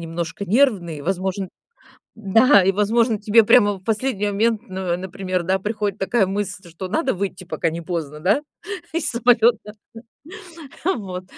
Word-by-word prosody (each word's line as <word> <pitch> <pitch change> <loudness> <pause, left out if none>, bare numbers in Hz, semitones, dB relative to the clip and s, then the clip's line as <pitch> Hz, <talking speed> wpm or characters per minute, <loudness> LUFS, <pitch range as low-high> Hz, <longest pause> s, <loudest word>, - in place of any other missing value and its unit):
немножко 165 +3 -5
нервный, 195 - +1
возможно 190 +2 -2 0.7
да, 220 +1 +5
и, 195 - +3
возможно, 220 +2 +1
тебе 215 +1 +4
прямо 205 -3 +5
в 185 -1 -14
последний 220 -1 -1
момент, 220 +2 0
н 185 -2 -2
например, 185 -1 -3
да, 190 +2 0
приходит 210 0 -3
такая 195 +1 +1
мысль, 195 -2 -4
что 185 +3 -7
надо 270 - 0
выйти, 185 -1 -4
пока 170 -1 -2
не 165 +1 -5
поздно, 155 -3 -5
да, 200 - +2 0.5
из 310 -3 +1
самолета? 235 -3 +2 1.1
Вот, 190 - -2
195 Hz, 140 wpm, -21 LUFS, 185-220 Hz, 1.1 s, да